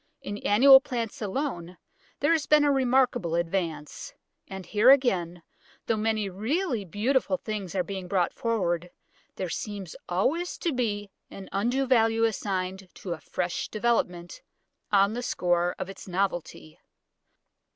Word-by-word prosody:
In 205 +1 -5
annual 265 +6 +7
plants 235 -5 -4
alone 190 - -3 0.4
there - - +3
has 320 -3 +1
been 300 -1 +5
a 290 - +3
remarkable 250 -9 +2
advance. 170 -3 -3 0.3
And 190 -1 -8
here 210 +7 +4
again, 180 -11 +3 0.4
though 225 - +1
many 215 -1 0
really 235 - -1
beautiful 255 - 0
things 205 -6 -5
are 185 - +1
being 190 0 -6
brought 180 -1 0
forward, 180 -7 -1 0.5
there 185 - -3
seems 195 0 -5
always 290 - 0
to 335 - -1
be 205 -5 -2 0.2
an 195 - -10
undue 245 +7 0
value 225 -3 +3
assigned 190 -4 -2
to 180 - -5
a 165 - -8
fresh 175 -1 -3
development, 195 -6 -1 0.5
on 200 0 +4
the 245 - -3
score 175 -6 0
of - - -4
its 195 0 -10
novelty. 175 - -3
205 Hz, 140 wpm, -27 LUFS, 180-245 Hz, 0.5 s, annual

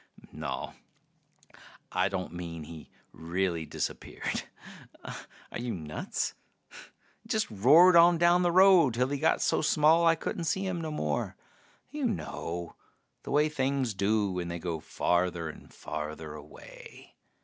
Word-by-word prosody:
Naw, - - -5 1.2
I 90 +2 +1
don't 95 -3 -4
mean 85 -2 -6
he 80 0 -11 0.2
really 85 -1 -2
disappeared - - -4 0.6
are - - -10
you 120 -2 -3
nuts? 75 -3 -4 0.9
Just 220 - -1
roared 150 - +6
on 170 0 +7
down 175 +1 +4
the 175 -1 +2
road 180 -8 +6
till 125 +2 +1
he 145 0 -2
got - - +2
so - - +1
small 155 +2 +4
I 165 0 +5
couldn't 165 +1 -4
see 190 +5 0
him 180 -3 -2
no 160 - -4
more. 75 - -2 0.6
You 295 -2 -3
know 85 - -5 0.5
the - - -10
way 150 +2 +3
things 135 -4 -1
do 100 +1 +1
when 90 -1 -3
they 85 0 -4
go 85 -1 -4
farther 85 0 -1
and 75 - -12
farther 75 0 -6
away. 75 0 -13
110 Hz, 140 wpm, -29 LUFS, -, 1.2 s, on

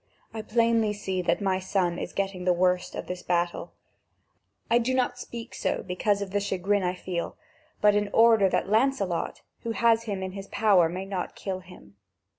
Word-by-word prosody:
I 220 - -4
plainly 230 -1 +2
see 190 -3 -3
that 170 +2 0
my 190 -1 +1
son 185 -2 0
is - - -5
getting 195 -2 -3
the 180 0 +3
worst 180 0 +1
of - - -5
this 180 0 -5
battle; 175 0 -1 0.9
I 235 - +4
do 255 +2 0
not 245 -1 0
speak 235 -1 -8
so - - -2
because 200 +2 0
of 190 - -8
the 205 - +1
chagrin 200 0 0
I 180 0 -1
feel, 180 -1 -4 0.4
but 210 -1 +6
in 205 0 +1
order 225 -4 +5
that - - 0
Lancelot, 215 -6 0 0.2
who 230 - -4
has 230 0 +3
him 200 -3 -3
in 190 - -4
his 195 +1 -8
power, 195 -7 +4
may 185 +3 -5
not 195 -2 -4
kill 190 -2 -4
him. 180 - -16
195 Hz, 190 wpm, -27 LUFS, 180-220 Hz, 0.9 s, but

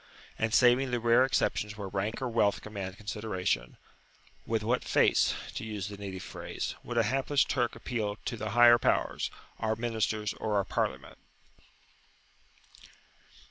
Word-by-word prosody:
And, 110 0 0
saving 125 +2 +5
the 120 -1 0
rare 120 +2 +5
exceptions 105 -5 0
where 100 -2 -5
rank 100 +6 -3
or - - 0
wealth 115 -4 +1
command 100 -2 -6
consideration, 105 -3 -2 0.7
with 110 -1 0
what 120 +3 +1
face, - - +3 0.2
to - - -5
use 105 -3 -4
the 100 - -8
native 95 -2 -6
phrase, - - -5
would 120 - -5
a 115 - +5
hapless 135 +5 +2
Turk 120 -3 -1
appeal 105 -4 -3
to - - -2
the 110 -1 -4
higher 120 +2 +7
powers, - - +1 0.3
our 110 0 0
ministers 110 -2 -1
or 110 -1 -2
our 100 -1 +2
Parliament? - - -3
110 Hz, 145 wpm, -30 LUFS, 105-120 Hz, 0.7 s, higher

